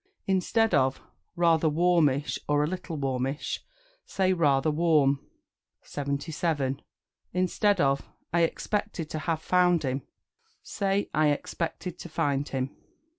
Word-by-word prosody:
Instead 195 +4 +2
of 130 0 +3 0.4
"Rather 165 -2 +3
warmish" 150 -3 +2
or 145 0 +3
"A - - +1
little 180 -2 -5
warmish," 135 +1 -2 0.4
say 185 -1 +1
"Rather 150 -3 +3
warm." 150 -4 +3 0.6
77. 140 -1 -2 0.5
Instead 185 +2 +2
of 140 -2 +3 0.3
"I 170 - +3
expected 170 -1 -1
to 155 - -2
have 160 0 -2
found 180 -2 +3
him," 135 0 -1 0.6
say 200 0 -1
"I 155 0 +3
expected 165 +4 -3
to 175 - -8
find 140 -2 0
him." 130 0 -3
160 Hz, 120 wpm, -27 LUFS, 140-180 Hz, 0.6 s, of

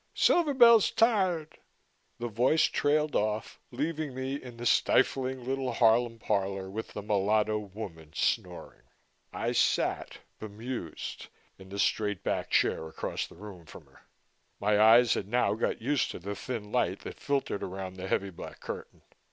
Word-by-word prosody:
"Silver 310 -5 +3
Bell's 235 -4 +7
tired." 185 -9 +1 0.6
The 120 - -3
voice 125 +8 +2
trailed 150 +1 +1
off, 105 0 -1
leaving 150 +1 -3
me 130 +1 -3
in 125 -4 -7
the 120 - -6
stifling 130 +1 +2
little 135 0 -2
Harlem 115 0 +3
parlor 95 -3 -2
with 110 +3 -6
the 105 - -6
mulatto 105 +1 +1
woman 95 -6 -9
snoring. 60 +1 -2 0.5
I - - -2
sat, - - 0 0.2
bemused, 110 -3 -6 0.3
in 95 0 -13
the 100 - -7
straight 105 -1 0
back - - -2
chair 80 - +1
across - - -4
the - - -16
room 90 -3 -11
from - - -12
her. - - -22 0.6
My 105 +1 +2
eyes 115 +2 +7
had 95 - -3
now 115 -2 +2
got 110 0 -2
used 140 +2 +1
to - - -6
the 100 +4 -5
thin 105 -1 -6
light 100 -6 0
that - - -9
filtered 140 -7 -1
around 95 0 -5
the 95 +1 -5
heavy 95 0 -1
black 85 - -10
curtain. - - -8
110 Hz, 155 wpm, -29 LUFS, 100-130 Hz, 0.6 s, Bell's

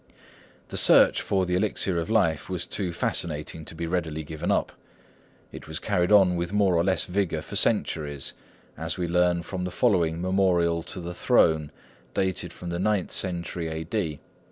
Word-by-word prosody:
The - - -4
search - - +6
for 95 -2 0
the 90 - -2
elixir 95 -2 0
of 85 - -4
life 80 -9 +1
was 90 -3 -2
too 95 -4 -2
fascinating 80 -1 -2
to 80 - -9
be 85 +1 -4
readily 80 -3 -2
given 75 +1 -5
up. - - +1 0.8
It - - -10
was 80 0 -5
carried 90 -2 0
on 95 -4 +6
with 85 +1 -2
more 100 -3 +3
or 85 - +3
less 95 0 +1
vigour 90 -4 -1
for - - -8
centuries, 75 -4 0 0.4
as 80 +2 -4
we 90 -2 -1
learn 90 0 +2
from 90 +1 -5
the 90 - -2
following 85 -3 +1
Memorial 90 -2 +2
to 90 - -6
the 85 +1 -5
Throne, 80 -3 +2 0.4
dating 95 -1 0
from 90 - -8
the 85 0 -3
ninth 100 -1 0
century 85 -2 -2
A.D. 80 0 -3
85 Hz, 175 wpm, -26 LUFS, 80-95 Hz, 0.8 s, search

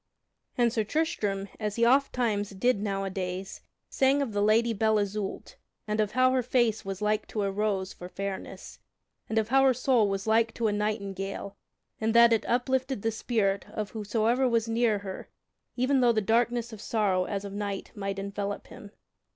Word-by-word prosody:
And 240 -2 +3
Sir 225 -3 +1
Tristram, 210 -8 -1
as 210 -2 -2
he 235 - +3
ofttimes 240 -5 +2
did 245 -3 +2
nowadays, 195 -1 -3 0.3
sang 275 +1 +2
of 235 -6 -5
the 205 - 0
Lady 225 +3 +3
Belle 220 +1 +2
Isoult, 205 - -3 0.3
and 210 +1 -1
of 215 -1 0
how 255 0 +4
her 260 0 +2
face 235 -3 +1
was 195 +1 -5
like 215 0 0
to 210 - -2
a 195 - 0
rose 195 -2 -1
for 180 - -10
fairness, 195 0 -6 0.5
and 225 - -1
of 220 0 +1
how 270 +2 +5
her 265 -2 +4
soul 245 -4 +2
was 195 0 -2
like 225 +1 +2
to 235 - -2
a 215 - +3
nightingale 200 -2 -3 0.4
in 220 0 0
that 235 0 +7
it 220 - 0
uplifted 260 -1 0
the 225 - +1
spirit 210 -3 -1
of 210 -1 -4
whosoever 225 +4 +1
was 230 -1 +1
near 225 -1 +2
her 195 -2 -7 0.5
even 260 +2 +2
though 245 -1 +5
the 220 - +2
darkness 235 +2 +1
of 210 - -9
sorrow 195 -6 +1
as 200 -1 -4
of 200 - -7
night 200 -1 -4
might 195 -3 -4
envelop 200 +1 -4
him. 205 - -11
215 Hz, 185 wpm, -28 LUFS, 200-235 Hz, 0.5 s, that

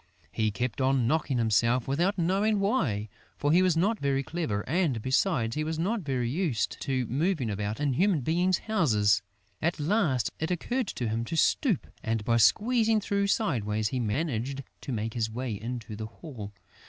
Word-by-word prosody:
He 110 -1 0
kept 120 +5 -3
on 130 -2 +2
knocking 140 0 +1
himself, 115 +2 +2
without 175 +10 +1
knowing 195 +5 +2
why; 155 - 0 0.3
for 145 - +1
he 175 +3 +5
was 180 -3 +3
not 210 +6 +2
very 140 -1 0
clever 130 -10 -3
and, 155 -6 +1
besides, 130 - +1
he 155 - 0
was 160 +1 -3
not 190 +1 -1
yet 130 -2 0
used 130 - -1
to 130 -3 -1
moving 140 - 0
about 105 +3 -3
in 145 -2 +1
human 180 +1 +2
beings' 175 +6 +2
houses. 110 - +3 0.4
At 170 +1 0
last, 150 - +1
it 160 - -1
occurred 240 +7 -1
to 120 - -3
him 110 +1 -1
to 165 - -3
stoop; 220 - +2 0.2
and, 110 -2 -1
by 115 -1 +3
squeezing 220 - +4
through 200 -1 0
sideways, 110 - 0
he 130 - -2
managed 135 +2 -2 0.2
to - - -5
make 110 -1 -2
his 115 -2 -1
way 120 +1 -3
into 115 +1 -5
the 110 +1 -5
hall. 115 -5 -9
135 Hz, 180 wpm, -28 LUFS, 115-180 Hz, 0.4 s, he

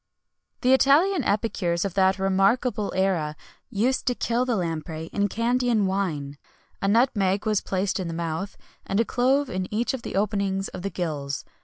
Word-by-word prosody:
The 255 0 +4
Italian 305 +9 +4
epicures 195 -4 0
of 195 - -3
that 190 0 +3
remarkable 200 +4 +1
era 180 -6 0 0.3
used 240 +6 0
to 245 - +2
kill 235 +2 0
the 245 -2 0
lamprey 165 -3 -4
in 205 0 +1
Candian 235 0 +1
wine. 155 -8 -2 0.4
A 195 - 0
nutmeg 205 -3 +2
was 215 -2 +1
placed 195 +2 -1
in 185 - -3
the - - -4
mouth, 170 +4 -4 0.3
and 195 - -1
a 230 - +3
clove 265 +5 +2
in 185 -5 -4
each 230 +5 0
of 265 - -4
the - - -6
openings 195 -1 0
of 185 - -8
the 200 - -2
gills. 150 -6 -4
195 Hz, 170 wpm, -25 LUFS, 185-235 Hz, 0.4 s, The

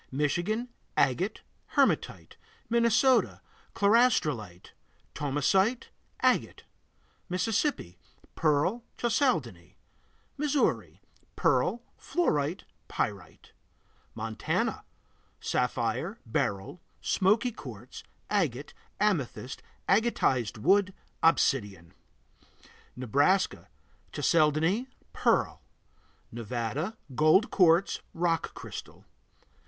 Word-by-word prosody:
Michigan 175 - -1 0.3
Agate, - - +1 0.3
hematite. - - +1 0.4
Minnesota 235 +2 +3 0.4
Chlorastrolite, 155 - +2 0.4
thomsonite, 170 - +1 0.3
agate. - - +1 0.7
Mississippi 185 - -1 0.3
Pearl, 160 +9 +1
chalcedony. 170 - -1 0.6
Missouri 295 -1 0 0.3
Pearl, 240 +1 +1 0.2
fluorite, 160 - 0 0.2
pyrite. 100 -4 -4 0.6
Montana 110 0 -2 0.5
Sapphire, 125 - -1
beryl, 100 - -2 0.2
smoky 215 +6 +2
quartz, 230 - -10 0.3
agate, 150 - -1 0.3
amethyst, 145 - -1 0.3
agatized 180 - +1
wood, 190 - +2 0.3
obsidian. 100 - +1 1.0
Nebraska 145 - +1 0.4
Chalcedony, 165 - +2 0.3
pearl. - - +1 0.7
Nevada 120 - -4 0.2
Gold 155 - +4
quartz, 175 0 +3
rock 165 -1 -1
crystal. - - -9
165 Hz, 65 wpm, -29 LUFS, -, 1.0 s, Gold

